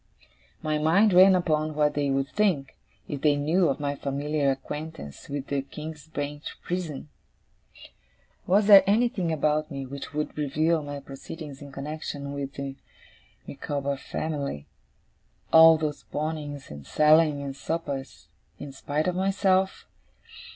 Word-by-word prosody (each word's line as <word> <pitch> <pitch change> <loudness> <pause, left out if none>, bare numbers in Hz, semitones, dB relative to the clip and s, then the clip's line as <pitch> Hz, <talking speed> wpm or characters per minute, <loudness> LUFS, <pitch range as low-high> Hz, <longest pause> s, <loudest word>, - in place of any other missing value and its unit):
My 155 -1 0
mind 185 +7 +4
ran 185 +1 +8
upon 155 -3 0
what 150 -1 +2
they 145 -1 0
would 135 0 0
think, 180 -11 0 0.3
if 140 -2 -5
they 150 -2 +4
knew 160 +5 +2
of 140 - -1
my 145 -1 -1
familiar 140 +1 -1
acquaintance 150 - -6
with 140 -1 -4
the 140 -1 -1
King's 150 +2 -9
Bench 145 -1 -5
Prison? 165 -5 -4 1.4
Was 200 +3 +4
there 200 -2 +9
anything 210 -4 +2
about 155 0 +1
me 135 -1 -5
which 140 +2 -7
would 150 0 -3
reveal 155 +3 +1
my 145 -1 -6
proceedings 140 +1 -9
in 140 -1 -10
connexion 140 0 -5
with 140 -1 -5
the 135 -1 -6 0.7
Micawber 140 0 -3
family 140 - -4 0.9
all 160 0 +9
those 155 -2 -3
pawnings, 150 - -5
and 70 -1 -10
sellings, 155 -1 +4
and 135 -1 -5
suppers 140 -2 -5 0.3
in 140 - -8
spite 145 +3 -2
of 180 - +1
myself? 190 0 +1
150 Hz, 135 wpm, -26 LUFS, 140-160 Hz, 1.4 s, there